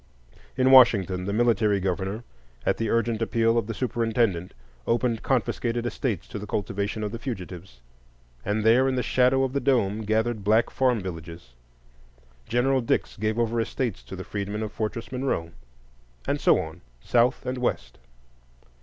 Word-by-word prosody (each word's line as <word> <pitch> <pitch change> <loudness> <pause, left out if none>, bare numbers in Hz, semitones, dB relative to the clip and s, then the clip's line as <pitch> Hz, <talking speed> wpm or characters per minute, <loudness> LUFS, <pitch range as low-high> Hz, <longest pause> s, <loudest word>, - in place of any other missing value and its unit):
In 130 +1 +4
Washington 100 -8 +6
the 100 - -2
military 105 -2 +2
governor, 95 +4 -2 0.4
at - - +1
the 115 -1 -1
urgent 115 0 0
appeal 115 0 +2
of 115 -3 0
the 115 - -3
superintendent, 115 -6 0 0.3
opened 115 -1 +1
confiscated 120 -2 -1
estates 120 -5 -2
to 105 - -5
the 105 - -7
cultivation 100 +2 -2
of 105 - -3
the 115 - -6
fugitives, 90 - -7 0.6
and 105 +2 -1
there 120 +4 +5
in 130 - -1
the 125 - 0
shadow 130 +1 +3
of 130 -1 -1
the 140 - +1
dome 115 -6 +1
gathered 110 0 0
black 110 +3 +3
farm 125 -4 +1
villages. 85 -6 -8 0.9
General 130 +3 +2
Dix 115 - -1
gave 110 +1 -1
over 115 0 +1
estates 115 -1 -3
to - - -8
the 95 - -6
freedmen 105 +2 -4
of 110 - -5
Fortress 115 +2 -4
Monroe, 125 -11 -2 0.7
and - - -1
so - - +5
on, - - -7 0.2
South 120 +1 +2
and 125 0 -3
West. 125 - -2
115 Hz, 160 wpm, -25 LUFS, 100-120 Hz, 0.9 s, Washington